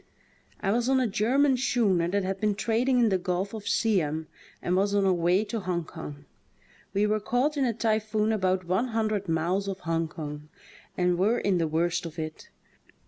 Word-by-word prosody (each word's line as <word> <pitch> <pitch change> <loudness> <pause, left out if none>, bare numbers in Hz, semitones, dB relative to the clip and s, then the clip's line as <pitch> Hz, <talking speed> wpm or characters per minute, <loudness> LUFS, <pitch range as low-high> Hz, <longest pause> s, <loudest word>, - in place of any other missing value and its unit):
I 195 - +1
was 240 +3 +1
on 265 0 +4
a 255 - +2
German 255 +6 +2
schooner 210 -9 +2
that 200 +2 0
had 190 +1 -2
been 210 -2 +1
trading 235 +5 +1
in 235 -2 +4
the 190 -2 +1
gulf 185 +3 -2
of 215 -2 -7
Siam 160 -8 +1 0.3
and 180 - -1
was 200 +2 +2
on 200 - +3
her 190 -1 +3
way 175 +3 +2
to 225 +1 -3
Hong 180 -3 -2
Kong. 150 -3 -9 0.7
We 200 +1 +2
were 215 +1 +1
caught 250 +8 0
in 275 -2 +1
a 235 - +1
typhoon 215 -1 0
about 185 -3 0
one 190 +8 +1
hundred 215 -4 -1
miles 175 +5 0
off 195 -1 -4
Hong 165 0 -1
Kong, 150 -2 -7 0.5
and 180 -1 +1
were 215 +6 +3
in 195 -5 +1
the 165 - +1
worst 165 +2 0
of 160 0 -11
it. 155 -1 -6
195 Hz, 195 wpm, -27 LUFS, 175-220 Hz, 0.7 s, on